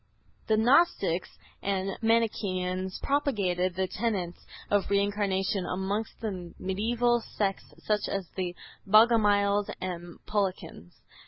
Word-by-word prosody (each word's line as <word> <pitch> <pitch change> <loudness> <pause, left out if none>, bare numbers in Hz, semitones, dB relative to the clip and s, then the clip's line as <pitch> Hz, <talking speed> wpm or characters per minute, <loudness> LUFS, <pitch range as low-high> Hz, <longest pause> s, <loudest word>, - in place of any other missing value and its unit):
The 220 - +3
Gnostics 220 - +3 0.3
and 195 -1 -1
Manichaeans 190 -5 0
propagated 195 -11 0
the 190 0 +1
tenets 190 -4 -2 0.3
of 205 -1 +2
Reincarnation 200 0 +1
amongst 195 +4 -3
the 185 -6 -5
mediaeval 235 +5 +1 0.2
sects 195 -2 -1
such 210 -1 0
as 195 -3 -3
the 180 -2 -3 0.3
Bogomiles 205 -2 +4
and 175 -2 -6
Paulicians. 190 - -3
200 Hz, 100 wpm, -28 LUFS, 185-220 Hz, 0.3 s, Bogomiles